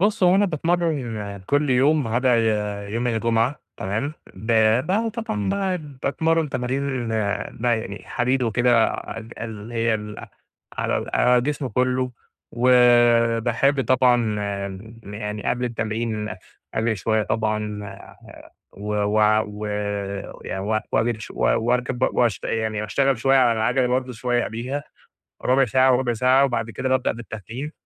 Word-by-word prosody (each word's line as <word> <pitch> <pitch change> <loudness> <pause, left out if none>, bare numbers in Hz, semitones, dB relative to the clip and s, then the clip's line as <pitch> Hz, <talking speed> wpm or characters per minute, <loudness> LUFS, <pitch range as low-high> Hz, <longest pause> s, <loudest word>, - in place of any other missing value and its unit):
بُص 205 +1 +1
هو 180 0 +6
أنا 200 +1 +4
باتمرَّن 140 - -2
كل 145 -1 +1
يوم 140 +3 +3
ما 110 - -4
عدا 130 +1 +2
آآ، 105 -3 0
يوم 115 +4 -2
الجمعة، 115 +3 0 0.2
تمام. 110 +10 -2 0.2
ب 110 +5 -5 0.6
طبعًا 105 - -3 0.3
ب 145 -4 -12
باتمرَّن 160 +1 +1
تمارين 130 -1 -2
بقى 110 +2 -1
يعني 100 -2 -7
حديد 125 +1 0
وكده، 120 0 +3
ال 115 +1 -8
اللي 110 0 -7
هي 115 -1 +1
ال 105 0 -6 0.5
على - - 0
ال - - -6
على 125 0 +4
الجسم 145 +2 -1
كله، 125 +2 0 0.4
وباحب 120 +1 +4
طبعًا 125 -4 +3 0.7
يعني 105 +1 -5
قبل 125 0 0
التمرين 110 -2 -2 0.5
أجري 110 0 0
شوية 110 +2 +1
طبعًا، 105 -1 -2 0.9
و 105 +1 -5
و 105 +1 +1 0.3
و 105 +1 -6 0.8
ي - - -4 0.3
وأجري 115 -1 +1
شوية، 65 - 0
و - - -1
وأركب 125 0 0
ب 130 - +3
واشت 120 -4 +1
يعني 110 -1 -1
وأشتغل 135 +3 +1
شوية 135 +4 +3
على 125 -2 +5
العجلة 115 +3 +1
برضه 125 +1 -1
شوية 120 +1 0
قبليها، 125 +6 -4 0.6
ربع 130 +1 +4
ساعة 130 +2 +4
وربع 125 -2 0
ساعة، 130 +4 +4
وبعد 115 -3 -2
كده 130 +3 -3
بابدأ 130 -1 +2
بالتدريج. 115 +5 -7
120 Hz, 140 wpm, -23 LUFS, 110-130 Hz, 0.9 s, هو